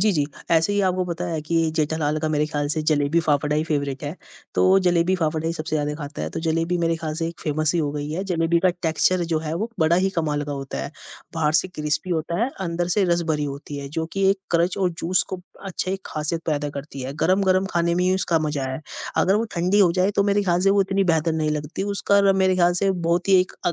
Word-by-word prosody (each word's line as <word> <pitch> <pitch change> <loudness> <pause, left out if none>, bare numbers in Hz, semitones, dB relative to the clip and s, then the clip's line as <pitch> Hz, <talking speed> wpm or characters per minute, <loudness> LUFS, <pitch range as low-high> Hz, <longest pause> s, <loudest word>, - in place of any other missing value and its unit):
जी, 215 +2 +4
जी। 145 -4 +1 0.2
ऐसे 165 +3 +3
ही 205 - +2
आपको 185 0 0
पता 175 0 -4
है 165 -3 -2
कि, 155 +3 -3
ये 165 -1 +2
जेठालाल 155 -1 0
का 155 - 0
मेरे 150 -1 +1
ख्याल 145 -1 -2
से 155 +2 0
जलेबी-फाफड़ा 150 0 +2
ही 155 - +2
फ़ेवरेट 140 -4 -2
है, 145 +5 -5 0.4
तो 190 +1 +5
जलेबी-फाफड़ा 170 -2 +1
ही 165 - 0
सबसे 155 -1 -3
ज़्यादा 150 0 -1
खाता 145 - -6
है। 80 - -3
तो - - -4
जलेबी 165 +2 0
मेरे 165 -1 +1
ख्याल 160 -1 -4
से 165 - 0
एक 170 - -10
फ़ेमस 155 0 0
ही - - +2
हो 145 -2 -1
गई 145 0 -4
है, 180 +5 -3
जलेबी 170 -2 +1
का 185 - +4
एक 180 - -2
टेक्सचर 175 +2 +2
जो 160 - +2
है, 155 0 -4
वो 215 +7 -3
बड़ा 160 +2 +4
ही 190 +2 +2
कमाल 150 -3 0
का 145 - -4
होता 135 - -5
है। 70 - -5 0.4
बाहर 155 -2 +1
से 185 - -7
क्रिस्पी 155 +1 -2
होता 170 +2 -1
है, 250 - 0 0.2
अंदर 170 +1 -2
से 205 - +4
रस 170 - +1
भरी 150 -1 0
होती 145 +1 -6
है, 140 0 -6
जो 160 +3 -3
कि 195 -1 +2
एक 195 - 0
क्रंच 170 +1 +2
और 185 -2 +2
जूस 180 +1 +2
को 185 - -3 0.2
अच्छा 185 -1 -3
एक 190 0 -3
खासियत 155 +2 -3
पैदा 145 -2 -1
करती 140 -1 -8
है। 130 +2 -4
गरम-गरम 190 +1 +3
खाने 170 0 +1
में 180 +1 +1
ही 185 +1 +3
उसका 175 -3 +1
मज़ा 145 -2 -2
है, 130 - -5 0.4
अगर 190 - +3
वो 220 +2 +1
ठंडी 180 +4 +3
हो 185 -4 +6
जाए, 185 +2 +2
तो 200 -1 +2
मेरे 205 0 +2
ख्याल 175 -2 +1
से 195 +1 +4
वो 200 0 +4
इतनी 195 +1 0
बेहतर 160 +1 +1
नहीं 155 -1 0
लगती, 150 +4 -3
उसका 200 0 +3
र - - +5
मेरे 185 0 +3
ख्याल 175 -1 +4
से 195 - +3
बहुत 175 0 0
ही 190 -1 +6
एक 185 - -3
अ, 175 - +2
165 Hz, 260 wpm, -23 LUFS, 150-185 Hz, 0.4 s, हो